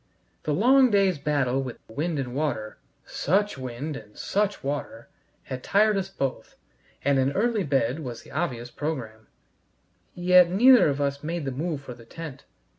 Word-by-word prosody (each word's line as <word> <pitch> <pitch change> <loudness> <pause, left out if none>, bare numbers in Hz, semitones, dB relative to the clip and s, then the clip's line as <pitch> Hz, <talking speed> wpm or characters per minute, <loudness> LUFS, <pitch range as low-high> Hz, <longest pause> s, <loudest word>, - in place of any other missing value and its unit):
The 155 - 0
long 255 - +5
day's 195 -6 +2
battle 140 -3 0
with 130 -3 -6
wind 155 +7 -2
and 130 -3 -3
water 130 -7 -3 0.3
such 205 +5 0
wind 130 +3 -5
and 105 -3 -11
such 205 0 -1
water! 140 -4 -4 0.3
had 130 -1 -6
tired 210 +2 +3
us 195 -1 -2
both, 135 -8 -4 0.5
and 140 -1 +3
an 135 +1 +1
early 220 0 +1
bed 135 -2 0
was 125 -6 -7
the - - -15
obvious 125 -7 -3
program. 120 -8 -5 0.9
Yet 180 0 +5
neither 225 - +6
of 140 0 -2
us 140 0 -1
made 165 0 -3
the 135 - -2
move 150 +2 -3
for 130 -3 -8
the 120 -1 -15
tent. 150 +1 -9
145 Hz, 165 wpm, -26 LUFS, 130-180 Hz, 0.9 s, neither